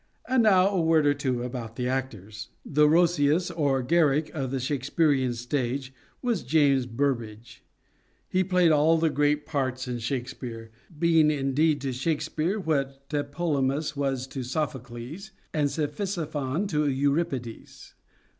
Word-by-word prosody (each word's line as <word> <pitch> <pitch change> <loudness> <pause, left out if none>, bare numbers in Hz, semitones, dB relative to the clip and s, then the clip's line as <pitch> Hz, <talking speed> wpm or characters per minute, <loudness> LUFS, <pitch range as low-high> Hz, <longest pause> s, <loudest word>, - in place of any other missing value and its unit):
And 255 -1 +3
now 195 -3 +5
a 195 -3 0
word 160 -2 +3
or 145 - +4
two 130 -4 -2
about 120 -3 -6
the 125 0 -2
actors. 110 -5 -4 0.2
The 150 +1 +3
Roscius 170 0 +3
or 140 -5 0
Garrick 150 +1 +2
of 135 -5 -3
the 135 +1 -2
Shakespearean 135 -1 +1
stage 130 +2 -3 0.3
was 235 -7 0
James 140 -5 +2
Burbage. 115 -3 -3 0.6
He 185 +1 +1
played 180 -2 +3
all 155 +2 +4
the 160 -1 +1
great 145 +1 +1
parts 130 -3 -2
in 120 -1 -3
Shakespeare, 120 -2 -5 0.3
being, 165 -1 +4
indeed, 145 +1 +1
to 135 -2 -2
Shakespeare 155 - -1
what 140 -5 -2
Tlepolemus 145 -1 -1
was 135 -2 -1
to 135 - -5
Sophocles 130 - -5 0.2
and 150 -2 +1
Cephisophon 155 0 -2
to 150 -3 +1
Euripides. 140 -3 -2
145 Hz, 135 wpm, -26 LUFS, 130-160 Hz, 0.6 s, now